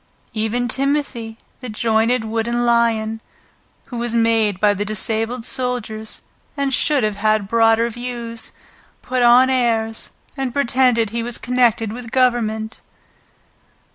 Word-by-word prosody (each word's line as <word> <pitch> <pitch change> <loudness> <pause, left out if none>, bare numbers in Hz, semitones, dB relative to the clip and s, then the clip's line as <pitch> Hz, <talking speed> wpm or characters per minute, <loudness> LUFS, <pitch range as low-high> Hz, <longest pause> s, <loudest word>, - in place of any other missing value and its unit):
Even 225 +3 -1
Timothy, 265 -4 -1 0.2
the 255 - -7
jointed 225 +2 +1
wooden 230 +2 -1
lion, 225 -2 +1 0.6
who 245 - -7
was 235 0 -1
made 225 -4 +2
by 210 0 +4
the 205 +1 -2
disabled 225 +3 -1
soldiers, 240 -4 -3 0.3
and 280 -1 0
should 285 -1 +3
have 210 -1 -1
had 215 -1 +1
broader 225 +1 +3
views, 235 -1 -5 0.5
put 255 -1 -1
on 245 +2 +6
airs 225 -3 0 0.3
and 265 -2 -3
pretended 245 -5 +2
he 235 +1 -2
was 235 0 -2
connected 240 -4 +1
with 240 -1 -7
Government. 225 -3 0
230 Hz, 125 wpm, -20 LUFS, 220-245 Hz, 0.6 s, on